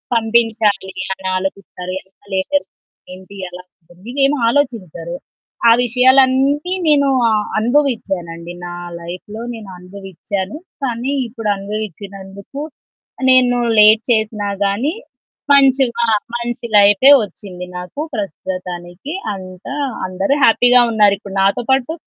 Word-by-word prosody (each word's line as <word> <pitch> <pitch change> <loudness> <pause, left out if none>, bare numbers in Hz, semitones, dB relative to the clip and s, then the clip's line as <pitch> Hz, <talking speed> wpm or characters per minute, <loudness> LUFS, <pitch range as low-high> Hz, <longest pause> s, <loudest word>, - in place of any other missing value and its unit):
పంపించాలి 225 -3 +1 0.2
అని 190 0 -7
ఆలోచిస్తారు. 185 -1 -5
ఎనకాల 195 +1 -24
ఏం - - -8
జరుగుతుంది? 285 - -1 0.3
ఏంటి? 190 +2 -13
ఎలా 180 0 -10 0.2
ఉంటుంది? 175 +3 -21
ఇదేమి 275 +1 +2
ఆలోచించరు. 195 - -2 0.5
ఆ - - +8
విషయాలన్నీ 265 +6 +3
నేను 280 -2 +4 0.5
అనుభవించానండి 195 - -1
నా 175 - -6 0.3
లైఫ్‌లో 185 +6 -8
నేననుభవించాను. 190 - -7 0.3
కానీ 245 +1 -2 0.2
ఇప్పుడు 225 -2 -4
అనుభవించినందుకు 200 - -7 0.7
నేను 250 -1 +5 0.2
లేట్ 215 +1 +7
చేసినా 215 -2 0 0.2
గాని 225 +11 0 0.6
మంచిగా 265 -4 +4 0.3
మంచి 240 0 -4
లైఫే 205 +7 +6
వచ్చింది. 185 -2 -8
నాకు 180 +11 -6
ప్రస్తుతానికి 185 - -6 0.2
అంతా 185 +6 -8 0.3
అందరూ 190 +9 0
హ్యాపీగా 245 +2 +6
ఉన్నారు. 210 -2 +4
ఇప్పుడు 200 -2 -9
నాతో 200 +5 +2
పాటు 265 +3 +1
210 Hz, 105 wpm, -17 LUFS, 190-250 Hz, 0.7 s, ఆ